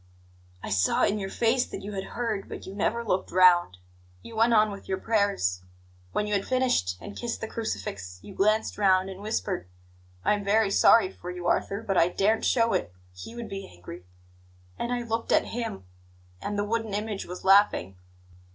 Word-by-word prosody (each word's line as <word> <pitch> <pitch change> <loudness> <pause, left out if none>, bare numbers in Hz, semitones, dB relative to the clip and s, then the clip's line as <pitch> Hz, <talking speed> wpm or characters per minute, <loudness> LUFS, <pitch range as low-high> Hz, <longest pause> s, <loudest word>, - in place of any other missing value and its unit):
"I - - -5
saw 95 -2 +2
in 210 +1 +2
your 195 -1 -4
face 240 +4 +2
that - - -7
you 205 - -6
had 195 -2 -4
heard, 225 -5 -2
but - - -7
you 190 - -8
never 230 +3 -1
looked 185 -3 0
round; 175 - +5 0.5
you 230 - -10
went 230 +2 +3
on 215 -2 +4
with 200 - -10
your 190 - 0
prayers. 200 - 0 0.5
When 210 - 0
you 210 - -2
had 200 -1 +1
finished, 250 - +1
and 205 - -9
kissed 240 -1 -4
the 220 - -4
crucifix, 100 - -5
you 200 - -10
glanced 215 +3 +1
round 190 -1 +3
and 190 +1 -10
whispered: 205 - -3 0.6
'I - - +4
am 205 -1 -2
very 200 0 +2
sorry 200 -1 +5
for 180 - -9
you, 180 -1 -6
Arthur; 200 +4 0
but 195 -4 -1
I 165 - +5
daren't 205 +5 +1
show 230 -2 +3
it; 85 - -1 0.2
He 90 - -10
would 235 -1 -6
be 195 -1 -6
angry.' 90 0 -11 0.7
And 235 - -3
I 245 -1 -1
looked 230 0 -3
at - - +4
Him, 230 - -4 0.6
and 205 - -3
the 205 - 0
wooden 225 -1 -2
image 210 -1 -3
was 180 +1 -8
laughing. 195 - +4
200 Hz, 195 wpm, -27 LUFS, 185-225 Hz, 0.7 s, round